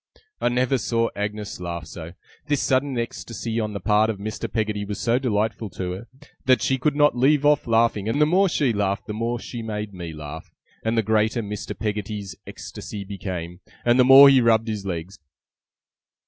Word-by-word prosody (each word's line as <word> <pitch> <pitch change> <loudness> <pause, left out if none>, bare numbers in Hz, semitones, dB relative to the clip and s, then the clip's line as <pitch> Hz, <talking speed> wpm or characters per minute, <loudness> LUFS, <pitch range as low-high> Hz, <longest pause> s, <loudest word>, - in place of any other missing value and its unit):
I - - +2
never 125 +2 +1
saw 115 +1 0
Agnes 105 0 -4
laugh 85 -2 -5
so. 80 +1 -9 0.3
This 145 -2 +1
sudden 130 0 +1
ecstasy 115 -1 -4
on 105 -1 -2
the 100 - -4
part 105 +3 +3
of 110 - -2
Mr. 105 +2 -5
Peggotty 105 -2 -1
was 100 0 -5
so 120 +1 +2
delightful 110 -3 -1
to 90 -1 -2
her, 95 +6 -7 0.4
that 130 -1 +4
she 135 -1 +1
could 145 +3 +1
not 145 -3 +4
leave 140 +4 +3
off 150 -3 +3
laughing; 115 -2 +2
and 115 - 0
the 150 - +6
more 185 +5 +3
she 140 -7 +1
laughed 100 -1 -1
the 105 - -5
more 115 +2 -2
she 120 0 -7
made 105 -2 -5
me 85 -3 -6
laugh, 75 0 -8 0.3
and 115 +1 0
the 115 - +3
greater 110 +2 +1
Mr. 105 0 -6
Peggotty's 105 -4 -4
ecstasy 100 -1 -8
became, 90 -3 -6 0.3
and 120 +1 +4
the - - +8
more 135 +2 +10
he 135 -2 +6
rubbed 115 -1 +3
his 105 -3 -4
legs. 90 +1 -5
110 Hz, 190 wpm, -23 LUFS, 100-120 Hz, 0.4 s, more